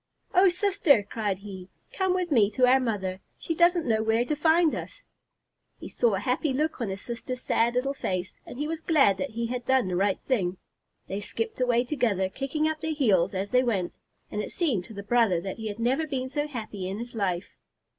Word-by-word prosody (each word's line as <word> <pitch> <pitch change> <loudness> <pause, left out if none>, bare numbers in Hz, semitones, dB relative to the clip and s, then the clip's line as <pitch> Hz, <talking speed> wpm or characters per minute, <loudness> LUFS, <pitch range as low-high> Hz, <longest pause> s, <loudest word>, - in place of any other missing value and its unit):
"Oh 375 0 +6
sister!" 360 - +3
cried 205 -2 -2
he. 190 -2 -9 0.2
"Come 375 -1 +1
with 360 -2 -1
me 220 -7 +5
to 255 - +4
our 255 +1 +5
mother. 195 -7 -2 0.2
She 330 - -3
doesn't 345 0 +3
know 220 -3 +2
where 225 +2 +2
to 300 - -1
find 320 +2 +3
us." - - -7 0.7
He - - -9
saw 235 -5 +2
a - - -1
happy 260 +5 0
look 300 0 -1
on 225 - -1
his 195 +1 -5
sister's 245 +1 -5
sad 235 +1 +1
little 270 +3 0
face, 185 -8 -4
and - - -10
he 295 +2 -2
was 320 0 -4
glad 275 - +4
that 280 - -2
he 235 0 -3
had 245 +1 -3
done 260 -3 +2
the 180 - -2
right 195 +1 +1
thing. 190 -8 0 0.5
They 195 +2 -4
skipped 445 - -4
away 245 -1 +3
together, 230 -9 0
kicking 275 +7 -1
up 315 -1 -3
their 320 -1 -2
heels 195 - +2
as 195 +2 -3
they 250 0 +5
went, 205 -8 -1 0.4
and 210 - -2
it - - -6
seemed 255 - 0
to 225 - -11
the 200 - -6
brother 215 -4 +3
that 190 +2 -5
he 220 -1 -5
had 205 -1 -5
never 260 +7 0
been 260 -3 -3
so 290 +2 -2
happy 215 -8 -5
in 195 - -4
his 240 +3 -7
life. 190 -4 -2
240 Hz, 220 wpm, -27 LUFS, 200-295 Hz, 0.7 s, Oh